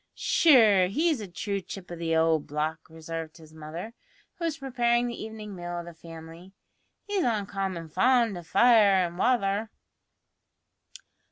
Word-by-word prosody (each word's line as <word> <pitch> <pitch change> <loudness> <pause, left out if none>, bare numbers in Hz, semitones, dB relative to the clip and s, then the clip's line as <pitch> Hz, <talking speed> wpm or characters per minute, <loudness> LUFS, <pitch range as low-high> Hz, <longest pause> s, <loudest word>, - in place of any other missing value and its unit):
"Sure, 245 - +5
he's 300 - 0
a 205 - -6
true 200 +3 -4
chip 185 0 -10
o' - - -5
the 165 -1 -1
owld 160 -1 +2
block," 155 +2 -3
observed 160 0 -7
his 160 -1 -16
mother, 160 +8 -8 0.5
who 335 - -2
was 320 -2 -2
preparing 240 -3 0
the 235 -2 -5
evening 215 -2 -8
meal 175 -1 -6
of 170 - -6
the 170 - -10
family; 165 +2 -12 0.5
"he's 405 -3 -1
uncommon 195 -6 -2
fond 230 +5 +2
o' 175 - -6
fire 215 +3 +5
an' 170 0 -7
wather." 210 -1 +1
195 Hz, 150 wpm, -27 LUFS, 165-235 Hz, 0.5 s, Sure